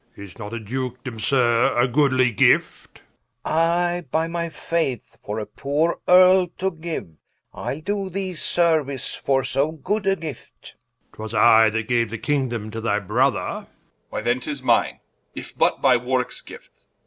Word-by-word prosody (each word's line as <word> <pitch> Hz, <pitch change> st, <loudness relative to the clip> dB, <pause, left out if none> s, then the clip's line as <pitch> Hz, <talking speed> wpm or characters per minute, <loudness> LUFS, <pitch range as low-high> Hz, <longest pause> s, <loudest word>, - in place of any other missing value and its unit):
War. 100 Hz, -, -9 dB
Is 95 Hz, +4 st, -15 dB
not 105 Hz, -3 st, -7 dB
a 115 Hz, -, -4 dB
Dukedome, 125 Hz, +1 st, -5 dB
Sir, 120 Hz, 0 st, +2 dB
a 120 Hz, +2 st, +4 dB
goodly 130 Hz, -1 st, +2 dB
gift? 105 Hz, -, +1 dB, 0.4 s
Rich. -, -, -3 dB
I, 175 Hz, +2 st, +1 dB
by 160 Hz, +1 st, 0 dB
my 170 Hz, 0 st, -3 dB
faith, 160 Hz, -8 st, -3 dB
for 105 Hz, +1 st, -5 dB
a 110 Hz, -, -3 dB
poore 145 Hz, +9 st, -1 dB
Earle 185 Hz, 0 st, +6 dB
to 190 Hz, +1 st, -1 dB
giue, 160 Hz, -, -7 dB, 0.4 s
Ile 145 Hz, -, -5 dB
doe 200 Hz, +2 st, -3 dB
thee 190 Hz, 0 st, -3 dB
seruice 155 Hz, -5 st, 0 dB
for 135 Hz, -1 st, 0 dB
so 140 Hz, +5 st, 0 dB
good 195 Hz, +6 st, -3 dB
a 195 Hz, -, +3 dB
gift 160 Hz, -5 st, -10 dB, 0.4 s
War. 110 Hz, -, -8 dB
'Twas 110 Hz, -, -7 dB
I 110 Hz, +1 st, +6 dB
that 110 Hz, 0 st, -3 dB
gaue 120 Hz, 0 st, +2 dB
the 115 Hz, -, -5 dB
Kingdome 120 Hz, -5 st, -2 dB
to 115 Hz, +1 st, -5 dB
thy 105 Hz, -2 st, 0 dB
Brother 115 Hz, +5 st, +1 dB
Edw. -, -, -5 dB, 0.4 s
Why -, -, -4 dB
then 120 Hz, +3 st, 0 dB
'tis 140 Hz, +1 st, -1 dB
mine, -, -, +1 dB, 0.3 s
if -, -, -6 dB
but -, -, +1 dB
by 130 Hz, -2 st, +5 dB
Warwickes 125 Hz, +1 st, 0 dB
gift -, -, -14 dB
War. -, -, -46 dB
135 Hz, 175 wpm, -22 LUFS, 115-165 Hz, 0.4 s, Earle